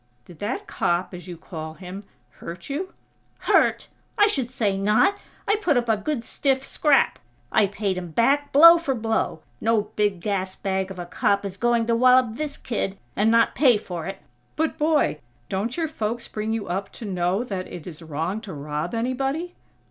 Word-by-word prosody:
"Did 170 - -15
that 210 +5 -3
cop, 175 +2 -1
as 180 +1 -9
you 175 -2 -7
call 160 -2 -7
him, 190 +3 -9 0.3
hurt 170 +10 -8
you?" 360 +7 -3 0.5
"Hurt!! - - +3 0.3
I 415 - +7
should 275 - 0
say 220 -6 0
not!! 210 - +3 0.3
I 415 - +3
put 305 -10 +2
up 240 -1 0
a 225 - +4
good 240 +3 -3
stiff 270 +1 0
scrap! 290 0 +2 0.3
I 210 - +4
paid 195 -2 -2
him 175 -1 -7
back, 280 - +2
blow 335 +4 +9
for 280 -5 -1
blow! 225 -7 -1 0.2
No 225 -2 +1
big 205 -3 +1
gas 190 0 -2
bag 190 -1 -2
of 190 - -8
a 175 - -5
cop 200 +3 +1
is 190 -2 -5
going 235 +2 +2
to 230 0 +2
wallop 255 0 +5
this 295 +3 -4
kid 195 -4 -3 0.2
and 210 +2 +3
not 230 0 +4
pay 250 -4 +5
for 175 -5 -6
it!" 195 - -5 0.4
"But, 320 +1 0
boy, 300 - +2 0.3
don't 210 - -2
your 330 -2 0
folks 235 -5 -3
bring 215 +1 -3
you 225 -2 -2
up 195 +3 -3
to 230 - -8
know 185 +2 0
that 195 -6 -4
it 170 - -8
is 170 -2 -9
wrong 165 +6 -3
to 205 -5 -8
rob 150 +5 -4
anybody?" 270 +8 -1
215 Hz, 190 wpm, -24 LUFS, 185-260 Hz, 0.5 s, blow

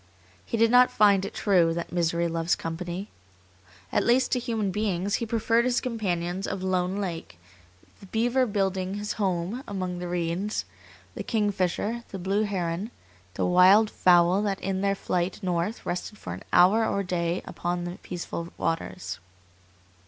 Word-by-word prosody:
He 230 - -3
did 225 0 +4
not 250 0 +7
find 200 -2 +4
it - - -6
true 175 -5 +3
that 170 - -4
misery 170 -1 +1
loves 165 0 0
company. 175 +4 -5 0.8
At - - +2
least 250 +2 +3
to 250 - +2
human 225 -5 -1
beings 200 -1 -1
he 230 - -2
preferred 230 +1 +2
his 250 0 +2
companions 190 -6 -2
of 185 - -4
Lone 185 0 0
Lake 175 - -5 0.6
the 195 - -13
beaver 240 +5 +1
building 195 -2 -1
his 205 0 -3
home 190 +6 -1
among 185 -3 -3
the 180 - -4
reeds, 175 +4 -2 0.5
the - - -6
kingfisher, 210 +1 -1
the 195 - -6
blue 195 +3 0
heron, 185 0 -2 0.5
the - - 0
wild 190 +4 +6
fowl 175 +2 +4
that 200 -2 -1
in 190 0 -2
their 200 0 +1
flight 180 -1 -1
north 180 +4 -2
rested 180 +4 -4
for 90 - -6
an 90 - -8
hour 190 +6 +5
or 200 - 0
a - - -5
day 175 -1 -1
upon 175 0 -3
the 175 +1 -6
peaceful 170 -1 -5
waters. 95 - -3
190 Hz, 160 wpm, -26 LUFS, 175-210 Hz, 0.8 s, not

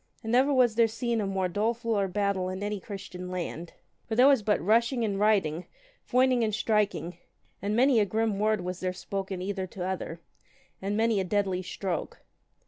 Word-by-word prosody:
And 225 - -3
never 260 +4 +4
was 250 -4 +4
there 230 0 +4
seen 230 0 -1
a 200 - -1
more 190 -1 0
dolefuller 220 +1 0
battle 190 -1 -1
in 185 +2 -5
any 205 0 -2
Christian 185 -2 -8
land. 175 -2 -5 0.3
For 220 - -2
there 250 +3 +6
was 275 -5 +5
but 210 0 +1
rushing 230 - +2
and 200 -2 -2
riding, 185 -6 +2 0.4
foining 255 -1 +4
and 215 -2 0
striking, 205 -6 0 0.4
and 205 +2 -1
many 255 0 +4
a 210 - +3
grim 215 0 -1
word 215 -1 +2
was 180 0 -4
there 185 0 -2
spoken 190 0 -4
either 190 -1 -3
to 180 0 -6
other, 185 -3 -4 0.6
and 200 +2 -2
many 225 -2 +2
a - - +1
deadly 190 -1 0
stroke. 185 0 -4
205 Hz, 185 wpm, -28 LUFS, 185-225 Hz, 0.6 s, there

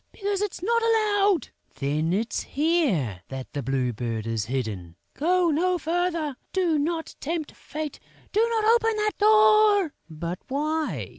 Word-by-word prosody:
"Because 400 -1 -2
it's 415 -4 -3
not 465 +3 +2
allowed!" 415 - +2 0.3
"Then 150 +4 -1
it's 220 +5 -1
here 265 - 0
that 135 -1 -7
the 145 - -2
Blue 130 -1 -1
Bird 115 -1 -3
is 115 -2 -2
hidden!" 110 -9 -4 0.2
"Go 350 +2 +2
no 360 +4 +1
farther, 335 -4 -1 0.2
do 345 -5 +2
not 325 +2 -2
tempt 315 0 -3
fate, 305 -1 -6 0.3
do 415 - +1
not 445 -2 0
open 450 0 +4
that 425 -1 -1
door!" 425 -4 +5 0.2
"But 170 +3 -5
why?" 305 +3 -2
320 Hz, 145 wpm, -25 LUFS, -, 0.3 s, door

